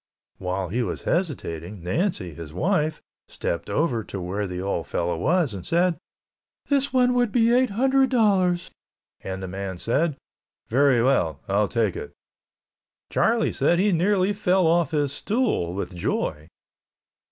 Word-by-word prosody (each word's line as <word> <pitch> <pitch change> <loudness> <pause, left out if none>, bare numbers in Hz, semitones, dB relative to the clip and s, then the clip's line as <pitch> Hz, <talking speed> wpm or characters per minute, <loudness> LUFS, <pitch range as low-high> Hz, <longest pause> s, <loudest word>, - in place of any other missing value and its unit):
While 90 0 -2
he 120 +6 -1
was 120 - -3
hesitating 100 - -3
Nancy, 95 - -1
his 80 -1 -9
wife, 155 - 0 0.2
stepped 85 - -4
over 130 -8 0
to 100 - -6
where 95 +3 -3
the 90 -1 -5
old 95 -3 -2
fellow 85 0 -1
was 155 - +1
and 95 -3 -6
said, 175 - +2 0.7
"This 280 -1 +1
one 250 -1 +3
would 245 -3 +2
be 235 0 +3
eight 255 +1 +3
hundred 265 +5 +2
dollars," 190 -7 +2 0.5
and 95 0 -6
the - - -4
man 95 0 -5
said, 140 - 0 0.5
"Very 130 -1 +4
well, 85 - +2
I'll 100 +2 +2
take 110 -5 0
it." - - -7 1.0
Charlie 230 0 +2
said 150 +5 +2
he 200 +3 +3
nearly 190 +3 +2
fell 190 -3 +2
off 165 -2 +3
his 145 -3 0
stool 210 - -1
with 100 -1 -4
joy. 80 -2 -2
145 Hz, 150 wpm, -24 LUFS, -, 1.0 s, Very